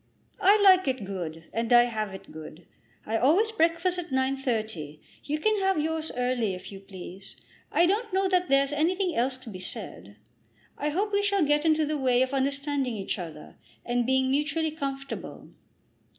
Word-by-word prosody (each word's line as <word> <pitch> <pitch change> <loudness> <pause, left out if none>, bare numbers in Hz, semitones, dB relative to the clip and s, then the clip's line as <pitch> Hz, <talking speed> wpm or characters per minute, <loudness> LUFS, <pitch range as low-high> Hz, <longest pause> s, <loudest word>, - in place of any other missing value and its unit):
"I 405 +2 +6
like 375 -3 +6
it 260 -6 -1
good, 170 -4 -5
and 230 +1 -2
I 240 0 +8
have 215 -4 -3
it 190 - -11
good. 160 +1 -10 0.4
I 225 +1 0
always 350 - +3
breakfast 350 -2 +1
at 350 - -6
9.30. 230 - -2 0.3
You 300 +1 -1
can 430 +6 +1
have 385 -3 +1
yours 320 +1 -2
earlier 245 -5 0
if 180 - -10
you 195 - -9
please. 190 0 -11 0.4
I 345 - +4
don't 420 +5 0
know 380 +1 +2
that 365 -1 +1
there's 275 +1 +3
anything 355 +4 +1
else 255 +2 0
to 255 -3 -10
be 185 - -8
said. 145 - -8 0.6
I 295 - -2
hope 400 +7 -1
we 405 - +3
shall 400 -4 +2
get 295 +2 +2
into 310 -1 +3
the 300 0 -2
way 255 -1 +3
of 260 +1 -3
understanding 275 -2 -1
each 195 0 -3
other, 160 -4 -9 0.3
and 240 0 0
being 260 0 +2
mutually 305 +3 0
comfortable. 275 -2 -6
275 Hz, 180 wpm, -27 LUFS, 220-330 Hz, 0.6 s, I